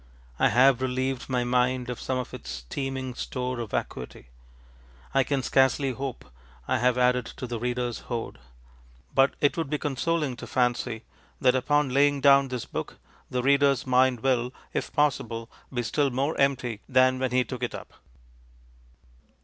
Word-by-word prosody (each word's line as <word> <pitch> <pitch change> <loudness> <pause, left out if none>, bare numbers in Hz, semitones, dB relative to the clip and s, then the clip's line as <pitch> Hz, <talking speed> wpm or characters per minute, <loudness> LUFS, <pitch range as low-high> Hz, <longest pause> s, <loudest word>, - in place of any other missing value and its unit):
I - - +5
have 130 0 +5
relieved 130 0 -2
my 125 -1 +1
mind 125 0 +1
of 125 -1 -5
some 130 - -1
of 125 - -5
its 65 0 -7
teeming 130 - -4
store 125 0 -4
of 115 -3 -4
vacuity. 60 -7 -5 0.8
I 135 - +4
can 135 -1 -1
scarcely 135 +1 +3
hope 130 0 -5 0.4
I - - +1
have 125 +1 +2
added 125 -1 +2
to - - -7
the 120 -2 -4
readerŌĆÖs 125 -1 -2
hoard. 115 - -5 0.7
But 135 +1 +4
it 145 - +2
would 165 -4 -2
be 150 - 0
consoling 150 0 -1
to - - -8
fancy 120 -2 0 0.4
that 125 -1 +4
upon 145 +2 +2
laying 145 +1 +4
down 140 0 +6
this 125 -2 -4
book - - -6 0.3
the 125 -1 -1
readerŌĆÖs 140 -1 +3
mind 130 -2 +3
will 125 -1 +1 0.2
if - - -2
possible 120 -6 0 0.2
be 120 -2 -2
still 140 +5 +1
more 135 +5 -1
empty 130 -5 +1
than 130 0 +4
when 130 0 0
he 125 +1 +2
took 125 -1 -7
it 125 - -2
up. - - -10
130 Hz, 165 wpm, -26 LUFS, 125-135 Hz, 0.8 s, down